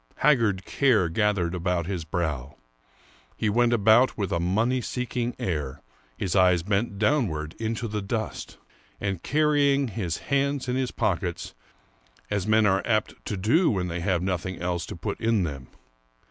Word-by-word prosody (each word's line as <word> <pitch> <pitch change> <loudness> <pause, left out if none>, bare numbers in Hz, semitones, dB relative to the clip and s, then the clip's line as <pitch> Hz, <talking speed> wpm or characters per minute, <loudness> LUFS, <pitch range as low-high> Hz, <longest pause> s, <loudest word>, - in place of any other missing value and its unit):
Haggard 115 -10 +2
care 115 -11 +2
gathered 95 -2 +1
about 90 -1 -1
his 90 -3 -4
brow; 75 -6 -3 0.8
he 105 - 0
went 120 +2 +3
about 115 +3 +4
with 100 -4 -2
a 85 - +1
money 110 +9 +1
seeking 125 0 -3
air, 75 -6 -3 0.3
his 90 -1 -2
eyes 90 -3 +4
bent 100 +2 -1
downward 100 - 0
into 115 +1 -2
the 105 -1 -3
dust, 110 +2 -4 0.4
and 95 -4 -2
carrying 145 -2 +2
his 95 -7 -3 0.2
hands 140 -1 +1
in 125 - 0
his 130 -1 0
pockets, 90 -5 -2 0.8
as 105 -1 -1
men 110 0 +4
are 95 -1 +3
apt 110 -2 0
to 100 - -3
do 130 - +3
when 90 -4 -1
they 85 +1 -3
have 90 -1 0
nothing 95 0 -2
else 90 -1 -2
to - - -6
put 95 +4 -4
into 110 -6 +2
them. 70 -4 -7
100 Hz, 160 wpm, -26 LUFS, 90-115 Hz, 0.8 s, about